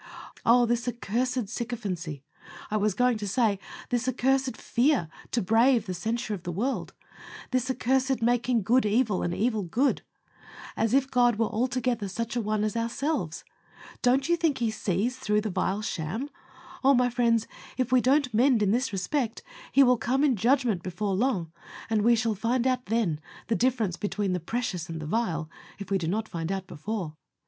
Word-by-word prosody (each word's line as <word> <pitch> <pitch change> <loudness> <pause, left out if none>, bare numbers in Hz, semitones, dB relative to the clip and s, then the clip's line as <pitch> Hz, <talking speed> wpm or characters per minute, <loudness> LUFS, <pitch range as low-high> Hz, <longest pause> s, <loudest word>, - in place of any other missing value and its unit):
Oh! 240 +1 +6
this 235 +1 -1
accursed 245 +1 -1
sycophancy; 195 - -4 0.5
I 215 - +1
was 210 -2 +1
going 245 0 +2
to 205 - -4
say, 215 -2 +1 0.3
this 245 +1 0
accursed 260 -1 +1
fear 245 - +1 0.2
to 235 - 0
brave 230 +3 +4
the 185 - -4
censure 220 +5 -2
of 195 - -5
the 175 0 -4
world 240 +10 -2 0.6
this 255 0 0
accursed 260 0 +1
making 240 -1 +1
good 245 +6 +3
evil 215 -1 +1
and 175 - -1
evil 220 +3 0
good, 230 +10 +1 0.7
as 225 +3 +1
if 270 -1 +2
God 245 -2 +4
were 225 - +2
altogether 245 -2 -1
such 230 +4 -4
an 240 - 0
one 210 0 0
as 215 0 -1
ourselves. 230 - -2 0.6
Don't 265 +2 +3
you 345 - +4
think 325 -4 +1
He 230 -3 0
sees 215 +4 -1
through 210 -5 +1
the 215 -1 -3
vile 195 +3 -1
sham? 215 - -3 0.5
Oh! 275 +1 +6
my 245 0 +2
friends, 230 -2 +2 0.3
if 255 -2 -1
we 255 -1 +5
don't 265 -1 +2
mend 240 0 +4
in 200 - +2
this 250 +3 +1
respect, 225 +5 -2 0.3
He 275 - +6
will 250 -1 +4
come 265 +5 0
in 280 -4 +4
judgment 235 -3 +2
before 190 +3 -2
long, 190 -6 0 0.4
and 215 -1 +3
we 235 +3 +5
shall 225 0 0
find 235 +4 0
out 255 -1 0
then 205 -8 0 0.3
the 230 - +2
difference 230 -8 +1
between 205 -2 -1
the 180 - -1
precious 180 -2 -3
and 165 -1 -5
the 155 - -6
vile, 165 -4 -1 0.3
if 200 -1 -9
we 195 - +2
do 165 - -3
not 215 +5 -1
find 165 -1 -4
out 190 -1 -3
before. 180 0 -5
230 Hz, 185 wpm, -27 LUFS, 200-250 Hz, 0.7 s, Oh